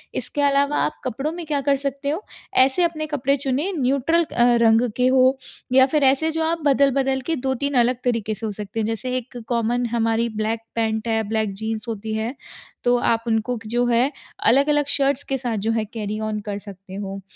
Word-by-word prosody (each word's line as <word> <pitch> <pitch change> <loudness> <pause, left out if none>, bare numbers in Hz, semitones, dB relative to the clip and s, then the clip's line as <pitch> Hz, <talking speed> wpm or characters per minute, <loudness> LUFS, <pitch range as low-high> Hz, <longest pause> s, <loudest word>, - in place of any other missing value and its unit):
इसके 290 - -2
अलावा 280 +1 +2
आप - - -4
कपड़ों 270 +5 -2
में 345 -1 -6
क्या 295 -2 0
कर 280 0 +2
सकते 280 0 -3
हो, 335 +8 -3 0.3
ऐसे 265 +7 +4
अपने 315 -2 -1
कपड़े 280 -2 +1
चुनें 275 +7 -1
न्यूट्रल 280 +6 +2
अ, 240 -6 0 0.2
रंग 225 +2 +4
के 250 0 +3
हों 260 0 +5 0.5
या 260 - +8
फिर 295 +1 +1
ऐसे 275 +4 +3
जो 320 0 -1
आप 330 +1 -1
बदल-बदल 275 -1 +3
के 325 - +2
2-3 280 +2 -1
अलग 250 0 0
तरीके 230 -3 0
से 225 - -6
हो - - -3
सकते 210 +2 -6
हैं। - - 0
जैसे 250 +3 -3
एक 250 0 -7
कॉमन 240 +1 0
हमारी 230 0 +1
ब्लैक 220 +1 -1 0.2
पैंट 220 0 -1
है, 225 0 +2
ब्लैक 220 -2 0
जीन्स 220 +3 -4
होती 220 0 -4
है। 225 +4 -2 0.5
तो 245 0 +4
आप 230 -1 +1
उनको 225 +2 0
क - - -10
जो 240 +2 +1
है 240 +3 +3 0.4
अलग-अलग 290 +3 +3
शर्ट्स 280 0 +1
के 270 - -2
साथ 240 -4 -2
जो - - +3
हैं 225 -1 0
कैरी 215 -1 -3
ओन 215 -1 -2
कर 200 0 -3
सकते 195 -2 -12
हो। 195 -1 -5
250 Hz, 205 wpm, -22 LUFS, 225-280 Hz, 0.5 s, या